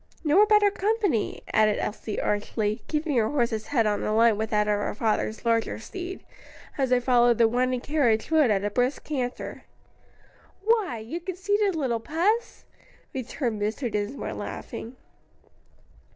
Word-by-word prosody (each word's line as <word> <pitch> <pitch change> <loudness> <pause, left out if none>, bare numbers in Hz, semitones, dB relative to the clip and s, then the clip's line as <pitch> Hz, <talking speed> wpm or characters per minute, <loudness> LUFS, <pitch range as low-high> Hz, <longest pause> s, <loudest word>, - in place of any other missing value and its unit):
"Nor 355 +8 +5
better 420 -1 +5
company," 405 - 0
added 215 -1 +4
Elsie, 210 0 -4
archly, 210 +1 -1
keeping 300 -2 -1
her 220 -2 +2
horse's 235 -6 -1
head 240 -6 +2
on 210 -1 0
a 215 - 0
line 230 -1 +5
with 220 +1 -2
that 210 -1 +1
of 210 - +3
her 205 - -3
father's 220 0 -1
larger 230 -1 +1
Steed, 360 - -7 0.5
as 265 -2 0
they 250 0 +4
followed 245 -2 +4
the 230 - +5
winding 250 +2 0
carriage 250 -5 +1
road 310 -5 +4
at 200 -2 +1
a 205 - -1
brisk 250 +5 0
canter. 255 -5 -4 1.0
"Why, 430 - +2
you 225 +10 -5
conceited 385 +2 0
little 255 -7 0
puss?" 360 - -1 0.5
returned 245 -3 -3
Mr. 220 +4 -2
Dinsmore 210 +6 -3
laughing. 240 +3 -7
245 Hz, 150 wpm, -26 LUFS, 220-320 Hz, 1.0 s, Nor